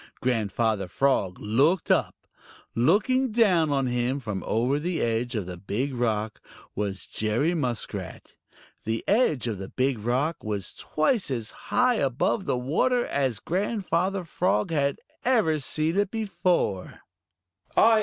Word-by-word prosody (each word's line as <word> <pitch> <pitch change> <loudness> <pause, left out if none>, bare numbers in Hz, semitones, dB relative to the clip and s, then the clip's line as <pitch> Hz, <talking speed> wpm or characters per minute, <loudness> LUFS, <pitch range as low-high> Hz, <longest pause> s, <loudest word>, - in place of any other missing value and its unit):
Grandfather 110 -4 0
Frog 95 -2 +1
looked 140 - +2
up. - - +2 0.6
Looking 220 - +2
down 190 -9 +3
on 135 -2 +1
him 125 +2 0
from 105 -7 -4
over 125 +6 +1
the 170 +2 -2
edge 120 +2 0
of 105 -4 -2
the 90 -1 -7
Big 105 +9 -2
Rock 110 -3 -1 0.3
was 100 -2 -3
Jerry 115 +10 0
Muskrat. 125 -9 -4 0.5
The 110 +1 -2
edge 200 - +2
of 110 -5 -3
the 95 - -6
Big 130 -2 0
Rock 130 +9 -1
was 105 -3 -3
twice 185 - 0
as 115 -5 -3
high 250 -1 +1
above 135 - 0
the - - 0
water 200 - +1
as 130 -7 -1
Grandfather 190 -1 -1
Frog 105 - 0
had 140 -3 +1 0.3
ever 215 -12 +2
seen 155 +4 -1
it 205 -1 +2
before. 180 - -1
135 Hz, 135 wpm, -26 LUFS, 110-175 Hz, 0.6 s, down